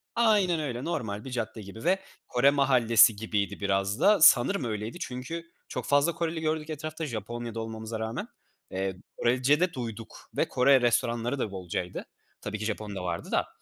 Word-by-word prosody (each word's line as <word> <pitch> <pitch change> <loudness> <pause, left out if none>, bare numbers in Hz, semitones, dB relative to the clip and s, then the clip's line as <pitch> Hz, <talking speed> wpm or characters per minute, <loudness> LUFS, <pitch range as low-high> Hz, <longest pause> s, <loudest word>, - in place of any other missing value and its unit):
aynen 205 -8 +3
öyle, 130 -4 -3
normal 110 -11 -3
bir 130 - -7
cadde 110 -2 -4
gibi 100 +5 -10
ve 190 +3 +3 0.3
Kore 125 +3 +4
mahallesi 120 -6 +5
gibiydi 100 -2 -2
biraz 100 0 0
da, 205 -4 +5
sanırım 145 +5 +6
öyleydi 110 - -4
çünkü 165 +6 -5 0.2
çok - - -4
fazla 145 +4 +3
Koreli 165 -1 -2
gördük 155 0 -1
etrafta 155 +1 -4
Japonya’da 115 -1 -5
olmamıza 110 0 -5
rağmen. 110 +1 -4 0.4
Eee, 95 0 -2 0.2
Korece 130 +5 +3
de 180 -1 +1
duyduk 115 -3 -7
ve - - +2
Kore 130 +1 +4
restoranları 120 +2 +1
da 105 - -2
bolcaydı. 90 -1 -4 0.4
Tabii 105 0 -4
ki 110 - -3
Japon 105 -2 -4
da 90 - -4
vardı 85 -1 -4
da. - - +1
120 Hz, 165 wpm, -28 LUFS, 110-150 Hz, 0.4 s, sanırım